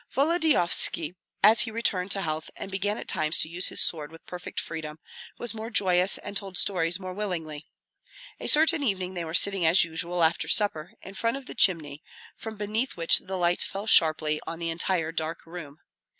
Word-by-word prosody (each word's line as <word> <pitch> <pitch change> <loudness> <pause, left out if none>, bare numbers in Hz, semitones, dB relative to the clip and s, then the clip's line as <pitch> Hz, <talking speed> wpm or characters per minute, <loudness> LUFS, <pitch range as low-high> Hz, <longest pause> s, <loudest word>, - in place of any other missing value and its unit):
Volodyovski, 275 - +3 0.3
as 220 +3 +7
he 230 - +1
returned 210 -5 -1
to 195 +1 -2
health 155 0 -4
and 195 - -8
began 205 +2 -2
at - - -8
times 155 -3 0
to - - +1
use 175 +3 -1
his - - +1
sword 155 -3 -4
with 165 - -15
perfect 180 0 -7
freedom, 155 -2 -7 0.4
was 240 -3 +1
more 220 0 -7
joyous 185 -3 +1
and - - -9
told 195 -2 -4
stories 180 -2 0
more 185 -1 -7
willingly. 165 -7 -5 0.7
A - - -6
certain 315 +1 +4
evening 190 -8 -2
they 175 -2 -4
were 160 +1 -5
sitting 195 -1 +3
as 165 +3 +6
usual, 170 +1 -2
after 160 +1 +1
supper, 180 -6 0
in 195 - -10
front 230 +5 -2
of 275 - -11
the - - -8
chimney, 150 -6 +1 0.3
from 220 -1 -9
beneath 215 +4 -3
which 165 -1 +4
the 190 0 -6
light 175 0 0
fell 200 +2 -5
sharply 155 -6 +4
on 165 - -5
the 165 0 -3
entire 165 -1 -1
dark 160 0 -5
room. 165 -4 -10
180 Hz, 195 wpm, -26 LUFS, 165-205 Hz, 0.7 s, as